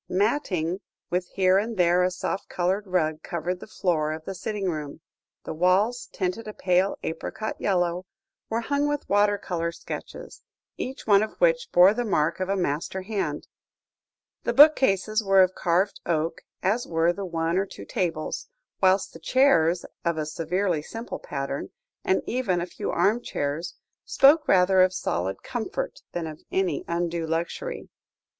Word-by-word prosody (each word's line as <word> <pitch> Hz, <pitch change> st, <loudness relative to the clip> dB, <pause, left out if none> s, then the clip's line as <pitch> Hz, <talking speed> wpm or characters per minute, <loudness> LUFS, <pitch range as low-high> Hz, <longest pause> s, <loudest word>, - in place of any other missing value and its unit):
Matting, 185 Hz, -, 0 dB, 0.3 s
with 180 Hz, 0 st, 0 dB
here 185 Hz, 0 st, +4 dB
and 220 Hz, +1 st, -3 dB
there 175 Hz, 0 st, +4 dB
a 180 Hz, -, +3 dB
soft 185 Hz, +1 st, -4 dB
coloured 190 Hz, +3 st, -1 dB
rug, 160 Hz, -4 st, 0 dB
covered 175 Hz, +1 st, -3 dB
the -, -, -10 dB
floor 160 Hz, -7 st, 0 dB
of 155 Hz, 0 st, -8 dB
the 195 Hz, -, -4 dB
sitting 200 Hz, +2 st, -3 dB
room; 155 Hz, -3 st, -4 dB, 0.4 s
the -, -, -5 dB
walls, 190 Hz, +9 st, +2 dB
tinted 190 Hz, +4 st, -3 dB
a 215 Hz, -, -7 dB
pale 185 Hz, +1 st, +1 dB
apricot 190 Hz, +6 st, -4 dB
yellow, 180 Hz, -1 st, 0 dB, 0.4 s
were 230 Hz, +1 st, 0 dB
hung 285 Hz, +4 st, 0 dB
with 290 Hz, -1 st, -2 dB
water 205 Hz, 0 st, +3 dB
colour 170 Hz, -4 st, -3 dB
sketches, -, -, -8 dB, 0.3 s
each 265 Hz, +1 st, -6 dB
one 205 Hz, -2 st, +5 dB
of 215 Hz, -, -4 dB
which -, -, +2 dB
bore 180 Hz, +3 st, +7 dB
the 245 Hz, +2 st, -1 dB
mark 170 Hz, -6 st, +1 dB
of 185 Hz, 0 st, -2 dB
a 195 Hz, -, +2 dB
master 175 Hz, +2 st, -2 dB
hand; 190 Hz, -8 st, -3 dB, 1.0 s
the 235 Hz, -, 0 dB
bookcases 230 Hz, -7 st, +5 dB
were 195 Hz, -1 st, +6 dB
of 185 Hz, 0 st, 0 dB
carved 185 Hz, +3 st, +1 dB
oak, 165 Hz, -1 st, -1 dB, 0.2 s
as 215 Hz, +6 st, +1 dB
were 165 Hz, +1 st, +2 dB
the 200 Hz, -, -6 dB
one 165 Hz, -2 st, -1 dB
or 195 Hz, -, -1 dB
two 100 Hz, -, -10 dB
tables, 165 Hz, -, -3 dB, 0.3 s
whilst 190 Hz, 0 st, +3 dB
the 165 Hz, -, -11 dB
chairs, 175 Hz, -, +3 dB, 0.2 s
of 170 Hz, -1 st, 0 dB
a 155 Hz, -, -1 dB
severely 165 Hz, +2 st, -1 dB
simple 225 Hz, +9 st, -7 dB
pattern, 140 Hz, 0 st, -4 dB, 0.3 s
and 190 Hz, -, +1 dB
even 235 Hz, -7 st, 0 dB
the 175 Hz, -, -1 dB
few 175 Hz, -, -5 dB
armchairs, 170 Hz, -5 st, -1 dB, 0.3 s
spoke 300 Hz, +3 st, +5 dB
rather 185 Hz, 0 st, +5 dB
of 185 Hz, 0 st, +3 dB
solid 95 Hz, -, -2 dB
comfort, -, -, -4 dB
than 170 Hz, -1 st, -3 dB
of 155 Hz, -1 st, -8 dB
any 185 Hz, -6 st, 0 dB
undue 170 Hz, -1 st, -1 dB
luxury. 170 Hz, -, -3 dB
185 Hz, 160 wpm, -26 LUFS, 170-205 Hz, 1.0 s, bore